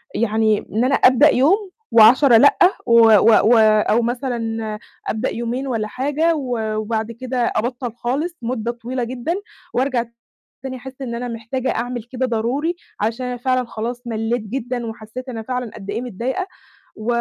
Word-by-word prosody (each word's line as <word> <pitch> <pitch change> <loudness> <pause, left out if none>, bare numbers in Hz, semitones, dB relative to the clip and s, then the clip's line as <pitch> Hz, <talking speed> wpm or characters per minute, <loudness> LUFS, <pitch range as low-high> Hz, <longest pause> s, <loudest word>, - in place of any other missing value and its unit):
يعني 220 -1 +2
إن 220 +3 +1
أنا 275 +2 +3
أبدأ 265 +4 +6
يوم 380 - +2 0.2
و10 235 +3 +7
لأ. 285 +5 +5 0.3
و 235 0 +5
و 210 -3 +6 0.3
و - - +6
أو 215 +1 +4
مثلًا 230 -3 -3 0.3
أبدأ 220 +4 -1
يومين 240 +3 -3
والّا 225 -4 -2
حاجة 290 +8 0
و 240 -7 -2
وبعد 220 +1 -2
كده 255 +2 -5 0.2
أبطّل 245 0 -2
خالص 285 +9 -3
مدّة 235 -1 -2
طويلة 240 +1 -4
جدًا 250 +6 -3 0.4
وأرجع 255 -2 0 0.6
تاني 265 -1 -5
أحس 265 +1 -10
إن 240 -3 -4
أنا 245 +1 -4
محتاجة 235 +3 -3
أعمل 245 +1 -3
كده 255 +2 -3
ضروري 255 +9 -1 0.2
عشان 230 +4 -1
أنا 250 0 -3
فعلًا 255 +1 0
خلاص 235 +2 -5
مَلّيت 225 +1 -1
جدًا 245 +2 -4
وحسّيت 225 +3 -8
أنا 230 -3 -5
فعلًا 250 0 -4
قدّ 200 -2 -7
إيه 220 +4 -3
متضايقة 250 - -3 0.5
و 215 - -8
240 Hz, 160 wpm, -20 LUFS, 225-260 Hz, 0.6 s, و10